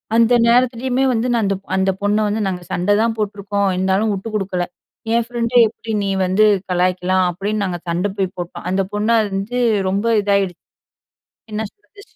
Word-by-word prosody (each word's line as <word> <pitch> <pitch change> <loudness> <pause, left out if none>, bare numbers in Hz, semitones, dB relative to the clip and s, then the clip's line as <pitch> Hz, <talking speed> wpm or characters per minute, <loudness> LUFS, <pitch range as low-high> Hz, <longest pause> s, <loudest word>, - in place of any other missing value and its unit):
அந்த 230 +1 +4
நேரத்திலேயுமே 250 +2 +2
வந்து 230 +1 0
நான் 230 -2 +1
அந்த, 195 0 +1 0.2
அந்த 190 0 +2
பொண்ண 205 +1 +1
வந்து 210 +2 -1
நாங்க 180 -2 -4
சண்டதான் 205 +6 +1
போட்டுருக்கோம். 200 -1 -1
இருந்தாலும் 190 +4 +1
வுட்டு 195 +3 -5
குடுக்கல. 190 -3 -1 0.5
"என் 235 0 +3
ஃப்ரெண்ட்ட 240 0 -3
எப்பிடி 225 +1 -8
நீ 200 - -1 0.2
வந்து 190 +4 +3 0.3
கலாய்க்கலாம்" 180 +1 +1
அப்பிடின்னு 205 +4 -2
நாங்க 180 -2 -3
சண்ட 175 +4 0
போய் 190 -1 -1
போட்டோம். 175 -1 -6
அந்த 190 +1 +1
பொண்ண 210 +2 -1
அறிஞ்சு 205 +4 -3 0.3
ரொம்ப 200 +3 -1 0.2
இதாகிடுச்சு. 200 -3 0 0.9
என்ன 215 +1 -2
சொல்றது, 405 0 -19
205 Hz, 160 wpm, -19 LUFS, 190-225 Hz, 0.9 s, அந்த